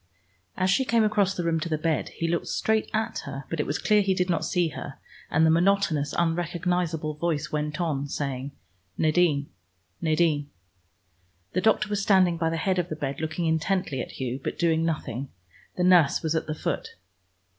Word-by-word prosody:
As 185 0 +2
she 265 - +3
came 235 -3 +2
across 205 -3 +2
the 175 - -2
room 165 -1 +1
to 170 - -4
the 155 - 0
bed, 160 0 -1
he 165 - -3
looked 170 0 -1
straight 220 0 0
at 220 +1 -1
her, 140 -1 -6
but 165 - -2
it 150 - 0
was 145 - -1
clear 210 -1 +3
he 195 -1 +1
did 180 0 +1
not 165 - 0
see 175 -2 +1
her, 140 -2 -7 0.3
and 160 +2 +3
the 160 - +5
monotonous, 170 -4 +2
unrecognizable 170 -1 0
voice 150 -2 -2
went 150 +1 -2
on 145 -5 -1
saying, 140 -1 -3 0.5
"Nadine, 155 -3 +2 0.5
Nadine." 155 -3 +1 1.0
The 185 - +1
doctor 220 0 +3
was 205 -1 -1
standing 185 -4 +4
by 165 -1 +1
the 165 - -2
head 185 +2 0
of 175 0 -2
the 155 - -3
bed, 140 -1 -4
looking 160 +2 -2
intently 160 -3 0
at - - -7
Hugh, 130 0 -4
but - - -3
doing 165 -2 +2
nothing: 140 -5 -3 0.5
the 180 - +1
nurse 175 -6 +5
was 160 -1 0
at 160 - -1
the 155 - -3
foot. - - -3
165 Hz, 190 wpm, -26 LUFS, 150-180 Hz, 1.0 s, the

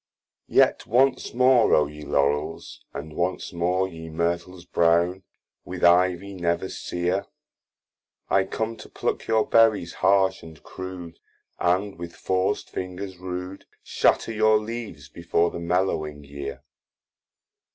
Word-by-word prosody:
YET - - +3
once 130 +4 +2
more, 125 -1 +5
O 75 - +4
ye 75 +1 -10
Laurels, 75 +2 -1
and 75 +2 -7
once 90 +1 -2
more 90 +2 +1
Ye 80 -2 -9
Myrtles 85 +2 -2
brown, 85 +2 +2 0.4
with 90 0 -7
Ivy 90 +2 +4
never 85 0 -1
sear, 90 +3 -2 1.0
I 95 0 +3
com 110 +2 -3
to - - -12
pluck - - -3
your 110 -1 +3
Berries 110 -6 +3
harsh 95 -1 +3
and 80 -2 -13
crude, 90 -2 -8 0.4
And 95 +1 0
with 85 0 -7
forc'd 95 +2 -1
fingers 95 +1 -6
rude, 90 +1 -6 0.2
Shatter - - +2
your 110 0 +4
leaves 110 -9 -6
before 85 +1 0
the - - -6
mellowing 85 -4 -1
year. 70 0 -7
90 Hz, 125 wpm, -25 LUFS, 85-95 Hz, 1.0 s, more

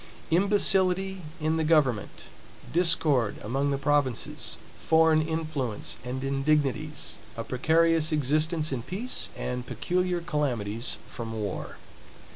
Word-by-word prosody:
Imbecility 190 0 +3 0.2
in 155 +1 0
the 160 - +1
government; 145 -9 +1 0.5
discord 155 - +3
among 135 +6 0
the 140 - 0
provinces; 140 -3 0 0.2
foreign 160 -1 +4
influence 155 -8 -3
and 130 +2 -4
indignities; 140 +1 0 0.2
a 115 - -3
precarious 160 +5 +2
existence 155 +2 +1
in 130 -3 -2
peace, 210 - -3
and 125 0 -4
peculiar 180 0 -1
calamities 125 -9 -2
from 115 -1 -6
war. 100 -3 -4
150 Hz, 105 wpm, -27 LUFS, 130-165 Hz, 0.5 s, foreign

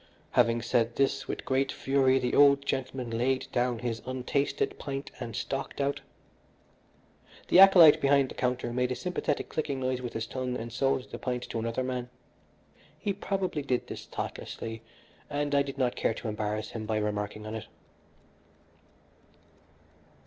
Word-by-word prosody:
Having 115 -1 +3
said 120 -1 +1
this 135 0 +1
with - - -4
great 135 +1 +1
fury, 135 -1 +2
the 125 -2 -1
old 140 -1 +6
gentleman 130 -2 -3
laid 130 +2 +1
down 125 0 +1
his 115 -2 -3
untasted 130 +2 -1
pint 135 0 -5
and 115 -4 -5
stalked 135 +4 -4
out. 140 0 0 1.5
The 180 - +6
acolyte 185 -6 +9
behind 140 -1 +4
the - - -7
counter 125 -1 -1
made 125 0 0
a - - 0
sympathetic 180 -4 -2
clicking 145 -3 -2
noise 130 -1 -1
with 120 -2 -5
his 115 0 -2
tongue 125 0 -3
and 115 -1 -6
sold 135 +1 0
the - - -6
pint 125 -1 -2
to 115 - -2
another 115 +3 -2
man. 125 -1 -3 0.9
He 200 - -2
probably 190 -5 -2
did 130 -3 -1
this - - -8
thoughtlessly, 115 0 -5 0.5
and 145 0 -1
I 140 - +5
did 140 -1 -4
not 125 -2 +1
care 115 - 0
to - - -6
embarrass 105 0 -3
him 110 -2 -5
by 110 0 0
remarking 105 0 -2
on 110 - -5
it. 110 -1 -6
130 Hz, 160 wpm, -29 LUFS, 115-140 Hz, 1.5 s, acolyte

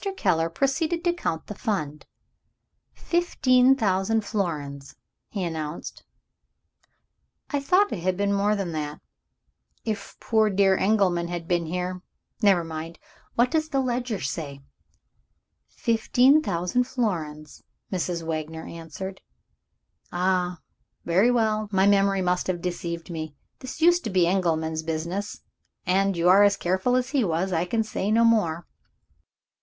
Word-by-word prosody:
Keller 165 -4 +1
proceeded 310 - 0
to 345 -1 +2
count 165 - -3
the - - -6
Fund. 170 - -3 0.8
"Fifteen 265 -7 +3
thousand 210 -1 +1
florins," 150 -9 -3 0.3
he 200 -3 -3
announced. 160 -2 -5 1.5
"I 290 - +1
thought 370 +8 +3
it - - -3
had 180 +1 -1
been 200 0 +1
more 205 +1 +2
than 195 -4 -3
that. 150 -1 -4 0.9
If 215 -3 -4
poor 220 -2 +2
dear 195 -1 +3
Engelman 190 -4 +2
had 170 -1 -5
been 175 -2 0
here 180 +2 -3 0.4
Never 195 -5 +4
mind! 165 +1 -6 0.4
What 245 +1 +3
does 315 -1 0
the 275 -3 0
ledger 245 -4 -1
say?" 140 -1 -5 1.1
"Fifteen 245 +5 +3
thousand 180 - 0
florins," 160 - -3 0.3
Mrs. 175 -2 -2
Wagner 160 0 -4
answered. 170 +4 -8 0.9
"Ah, 180 0 0 0.5
very 190 +8 +4
well, 215 -3 +1
my 190 -1 +3
memory 195 -1 +3
must 180 0 0
have 180 -2 -1
deceived 170 -1 -4
me. 155 -3 -5 0.2
This 260 +4 -8
used 345 +1 +5
to - - -1
be 185 -3 +3
Engelman's 160 -3 0
business; 170 +5 -4 0.4
and 195 +1 +2
you 170 +1 +2
are 190 +3 +7
as 205 0 +5
careful 190 +8 +1
as 255 0 0
he 280 -4 +2
was 180 +1 -1
I 165 +1 +1
can 225 +4 0
say 210 -2 -3
no 230 +2 +4
more." 175 -8 +2
Mr. - - -46
190 Hz, 140 wpm, -25 LUFS, 170-225 Hz, 1.5 s, are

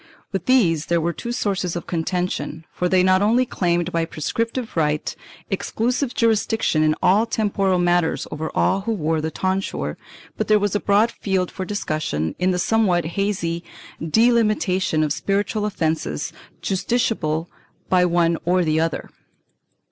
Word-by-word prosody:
With 195 - -3
these 175 - +3
there 170 0 +2
were 170 +1 -1
two 235 - -5
sources 195 -7 -1
of 175 - -4
contention, 170 -2 -2
for 180 - -1
they 185 0 +4
not 185 +1 +4
only 235 +5 +3
claimed 175 -5 0
by 165 -1 +1
prescriptive 230 - -3
right 150 -2 0 0.4
exclusive 245 +3 -1
jurisdiction 225 -7 +2
in 155 0 +3
all 205 +5 +4
temporal 200 -4 +1
matters 175 -1 +1
over 155 +1 -3
all 195 - +2
who 225 +3 -1
wore 160 -5 0
the 160 - -2
tonsure, 185 - -2 0.4
but - - -1
there 215 - +5
was 205 -1 0
a 205 - +1
broad 210 +4 +3
field 190 -5 -1
for 185 - -5
discussion 155 - -2
in 180 +1 +2
the 180 - +1
somewhat 180 -3 +2
hazy 180 -4 -1 0.4
delimitation 210 -4 +2
of 150 -1 +1
spiritual 205 +3 -1
offences 160 - -2 0.3
justiciable 190 -5 0 0.4
by 180 -1 +4
one 170 -1 +2
or 180 +1 +2
the 155 -1 +1
other. 165 0 -2
185 Hz, 150 wpm, -22 LUFS, 165-210 Hz, 0.4 s, there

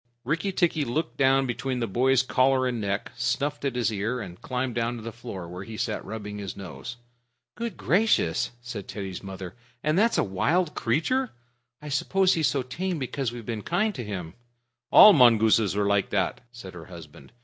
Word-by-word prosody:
Rikki 165 +8 -1
tikki 170 -5 +1
looked 145 +5 -3
down 135 0 +4
between 125 +1 -2
the 115 - 0
boy's 130 +5 +2
collar 130 0 +2
and 120 -3 -1
neck, 100 0 -2
snuffed 130 +5 -1
at 135 -3 -1
his 115 -3 0
ear, 110 +5 -2
and 90 -5 -8
climbed 125 -1 -2
down 120 +1 -1
to 115 - -8
the 115 - -5
floor, 110 -7 -8
where 90 +2 -7
he 110 +1 -8
sat - - -2
rubbing 105 -2 -6
his 100 -2 -6
nose. 100 +6 -8 0.6
"Good 235 -1 -5
gracious," 185 - +2
said 120 -5 -7
Teddy's 95 -3 -6
mother, 95 -2 -7 0.3
"and 155 +4 +2
that's 230 +2 +3
a - - +3
wild 150 - 0
creature! 235 - 0 0.5
I 150 - -6
suppose 190 +7 +2
he's 160 -4 +2
so 130 0 0
tame 175 +8 -3
because 135 -2 -3
we've 120 -2 -8
been 110 -2 -4
kind 200 - 0
to 125 - -5
him." 90 -6 -6 0.6
"All 210 - +10
mongooses 110 - +5
are 105 0 +1
like 100 -1 +1
that," 95 -4 -1
said 115 -6 -10
her 85 -2 -10
husband. 80 -6 -13
120 Hz, 190 wpm, -26 LUFS, 100-145 Hz, 0.6 s, All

